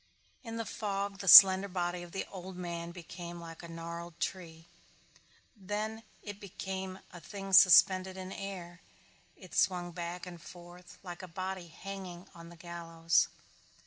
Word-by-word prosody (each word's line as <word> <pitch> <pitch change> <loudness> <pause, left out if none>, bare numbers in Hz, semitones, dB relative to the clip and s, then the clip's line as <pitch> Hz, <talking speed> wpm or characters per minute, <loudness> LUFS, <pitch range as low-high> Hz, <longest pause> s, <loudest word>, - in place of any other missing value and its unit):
In 225 -2 -6
the 230 - -3
fog 200 -2 -4
the 195 - -7
slender 190 0 +10
body 180 -1 -3
of 175 -1 -10
the 195 - -4
old 185 -1 -8
man 170 -1 -5
became 175 0 -9
like 165 -1 -10
a - - -10
little 165 - -10
gnarled 170 0 -8
tree. 165 -2 -5 0.9
Then 210 +2 -4 0.2
it 205 -1 -8
became 190 -1 -6 0.2
a 175 - -9
thing 195 +2 -8
suspended 185 0 +6
in 185 0 -7
air. 180 -3 -7 0.6
It - - -14
swung 175 -2 +1
back 175 +1 -6
and 175 -2 -10
forth 175 +2 -13
like 175 -1 -8
a 185 - -8
body 185 +1 -5
hanging 185 +1 -9
on 170 0 -12
the 170 - -14
gallows. 170 -1 0
180 Hz, 155 wpm, -31 LUFS, 170-195 Hz, 0.9 s, slender